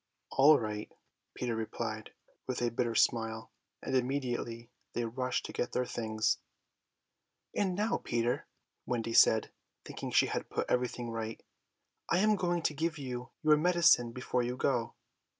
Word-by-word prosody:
"All 145 +3 +7
right," 105 -1 -4 0.4
Peter 120 -2 -2
replied 110 0 -4 0.3
with 130 - -2
a 120 -1 0
bitter 115 0 -1
smile, 110 -1 +1 0.3
and - - -1
immediately 125 -3 -2 0.2
they 120 - -1
rushed 125 +2 -2
to - - -7
get 120 - -2
their 125 - +1
things. 110 -2 0 1.2
"And 190 -3 +1
now, 220 +4 0
Peter," 120 +1 -1 0.4
Wendy 115 -2 -1
said, 110 -1 +5 0.3
thinking - - -6
she - - +4
had - - -3
put - - -1
everything 125 -1 -1
right, 115 0 -5 0.7
"I 170 - +3
am 210 +3 +4
going 175 -3 0
to 155 - +1
give 160 +1 -1
you 125 -2 -5
your 155 -1 +6
medicine 165 -8 +4
before 125 0 -1
you 120 +1 -2
go." 120 -4 0
125 Hz, 150 wpm, -32 LUFS, 115-145 Hz, 1.2 s, All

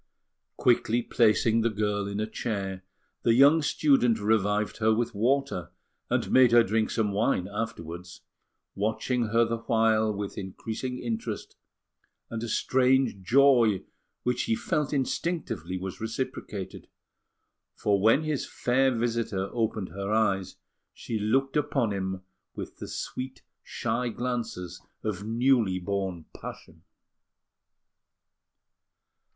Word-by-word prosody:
Quickly 120 -1 +2
placing 115 0 +3
the 115 - +2
girl 105 -1 -1
in 100 +1 -3
a 110 - 0
chair, 100 -4 -4 0.4
the 115 - +3
young 145 +5 +6
student 135 -6 +3
revived 105 0 +1
her 110 0 +3
with 115 +1 0
water, 125 - 0 0.4
and - - 0
made 130 -2 +6
her 120 0 +7
drink 110 +1 0
some 110 -3 0
wine 100 -2 +1
afterwards, 90 -4 -6 0.5
watching 110 +4 -1
her 115 +2 +3
the 115 0 -2
while 110 -1 +2
with 100 -1 -5
increasing 110 +6 -5
interest 115 -2 -4 0.8
and 115 -1 -3
a 120 - -3
strange 130 -2 +2
joy, 120 -2 +4 0.4
which 125 0 0
he 115 - +1
felt 150 +4 -1
instinctively 130 - -2
was 95 +2 -6
reciprocated; 110 -4 -5 0.9
for 100 -2 +1
when 115 +9 +4
his 155 -3 -2
fair 130 +2 +2
visitor 115 -5 -1
opened 110 -4 -1
her 100 +1 -4
eyes, 100 -4 +1 0.4
she 110 - -4
looked 135 +6 +1
upon 145 -6 +1
him 95 -1 -3 0.3
with - - -7
the - - -7
sweet 130 +1 -6 0.2
shy 120 +2 -2
glances 115 -7 -4 0.2
of 100 -3 -3
newly 115 -3 +2
born 95 -2 -3
passion. - - -10
110 Hz, 120 wpm, -27 LUFS, 100-125 Hz, 0.9 s, her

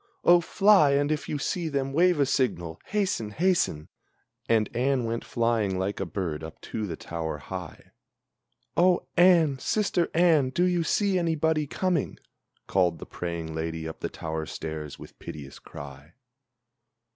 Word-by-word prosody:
Oh, 175 0 +6
fly, 185 -4 +5
and 145 +1 +2
if 155 - -2
you 150 - -1
see 165 +3 -2
them, 135 -2 -2
wave 175 +1 +4
a 140 - +4
signal! 85 -12 -1
Hasten! 190 - -1
hasten!" 160 - +1 0.6
And 110 -2 +3
Anne 130 0 +1
went 115 0 -2
flying 115 -5 0
like 95 +2 -2
a 95 - -2
bird 80 -3 -3
up 80 0 -9
to 110 -2 -4
the 85 - -4
tower 80 -2 -4
high. 90 +4 -8 0.8
"Oh, 180 0 +3
Anne, 170 -6 +5
sister 195 0 0
Anne, 160 -6 +4
do 170 +7 0
you 180 -2 +2
see 195 +2 +1
anybody 160 -2 +1
coming?" 180 0 -1 0.5
Called 90 -3 +1
the - - -9
praying 85 -2 -5
lady 80 0 -3
up 80 - -8
the - - -3
tower 80 -1 -5
stairs 80 0 -6
with - - -13
piteous 70 -3 -9
cry. 70 +3 -11
125 Hz, 155 wpm, -27 LUFS, -, 0.8 s, Oh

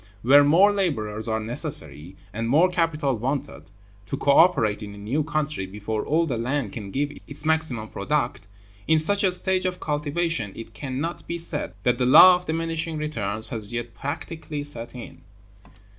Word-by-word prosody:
Where 140 +4 +6
more 175 +8 +5
laborers 110 - -1
are 110 0 -1
necessary, 95 -6 0 0.2
and 115 +1 -3
more 160 +8 +4
capital 160 -6 0
wanted, 125 - -4 0.4
to - - -4
co 140 - +2
operate 125 - +3
in 100 -1 -8
a - - -13
new 110 +9 -2
country 150 -9 -3
before 105 +3 -4
all 165 +3 +1
the 125 -7 -3
land 125 -2 -2
can 105 -4 -7
give 145 +7 -2 0.2
its 145 +1 -3
maximum 155 -9 0
product, 120 -1 -2 0.4
in 160 - +4
such 200 +6 +2
a 190 - +3
stage 185 0 +1
of 180 0 -4
cultivation 150 - -2
it 115 0 -10
can 130 +3 -5
not 165 +3 -5
be 170 - -3
said 165 -3 +2
that 125 0 +1
the 125 - +1
law 180 +8 +9
of 180 0 -7
diminishing 165 0 -2
returns 110 -8 -2
has 110 -1 -1
yet 120 0 -5
practically 150 0 -6
set 120 -4 -3
in. 125 - -10
145 Hz, 175 wpm, -24 LUFS, 115-160 Hz, 0.4 s, law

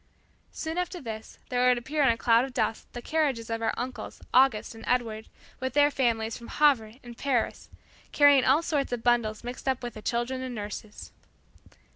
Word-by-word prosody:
Soon 320 +2 -4
after 360 0 -3
this 220 -5 -8
there 250 0 +2
would 250 -1 +4
appear 295 +6 -2
in 270 - +5
a 230 - +2
cloud 230 +1 +4
of 265 -1 -6
dust, 225 - -1
the 240 - -7
carriages 275 -8 -1
of 225 0 -2
our 225 - +1
uncles 250 +1 -5
August 255 -5 +4
and 225 0 -12
Edward 225 -3 -1 0.3
with 260 -1 -3
their 290 0 +4
families 230 -4 0
from 235 - -10
Havre 260 -8 +2
and 240 -1 -10
Paris, 255 -2 -1 0.4
carrying 285 -2 +6
all 310 +6 +4
sorts 290 -5 -1
of 240 -2 -3
bundles 235 -3 +1
mixed 245 +2 -7
up 260 -1 0
with 240 -2 -5
the 215 - -9
children 240 +4 -2
and 255 -1 -5
nurses. 210 0 -7
245 Hz, 190 wpm, -27 LUFS, 230-270 Hz, 0.4 s, carrying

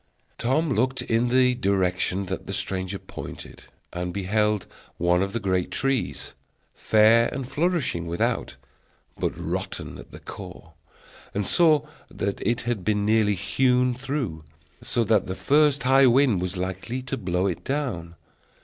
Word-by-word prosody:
Tom 135 +6 +1
looked 130 +2 +1
in 115 +2 +1
the 125 +1 +4
direction 95 -4 0
that 95 +1 -5
the 100 - -4
stranger 95 0 -2
pointed, - - -10 0.3
and 90 0 -3
beheld 105 +2 0 0.3
one 85 +1 +2
of 100 0 -1
the 115 - -2
great 95 -3 0
trees, 135 -7 -1 0.4
fair 110 +2 +4
and 130 -1 -4
flourishing 145 - 0
without, 85 +1 -1 0.6
but - - 0
rotten - - -4
at - - -12
the - - -10
core, - - -10 0.6
and 100 0 0
saw 155 - +4 0.2
that 100 0 -3
it 120 +3 0
had 120 -5 -2
been 105 0 +1
nearly 105 -1 +3
hewn 125 +5 +2
through, 125 - -4 0.4
so 120 - 0
that 110 -3 +2
the 95 - -3
first 145 +2 +3
high 135 +1 +6
wind 125 -6 +4
was 90 +1 -3
likely 95 +8 -4
to 130 +1 -3
blow 90 -5 -1
it 90 -4 -2
down. 125 - -3
110 Hz, 150 wpm, -25 LUFS, 95-130 Hz, 0.6 s, high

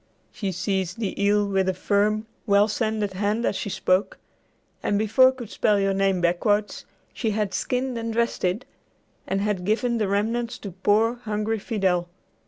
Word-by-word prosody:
She 195 -3 -3
seized 185 0 -2
the 200 -2 -2
eel 205 0 +3
with 190 -1 +1
a 185 - -1
firm, 210 +3 +1 0.2
well 200 0 +5
sanded 215 -2 -1
hand 210 +4 0
as - - 0
she 205 - -3
spoke, 185 +1 0 0.6
and 205 - 0
before 240 +5 +5
could 245 -5 -9
spell 210 -1 +2
your 195 0 +1
name 195 -2 +1
backwards, 205 +4 +1 0.3
she 225 - -1
had 210 -2 -1
skinned 255 0 -1
and 230 0 -3
dressed 235 +1 -1
it, 185 +7 0 0.6
and 195 +1 0
had 205 -3 -1
given 230 +4 0
the 210 - +1
remnants 225 +4 -1
to 200 - -7
poor 210 +6 +2
hungry 215 +1 -1
Fidel. 190 -5 0
205 Hz, 170 wpm, -24 LUFS, 195-220 Hz, 0.6 s, well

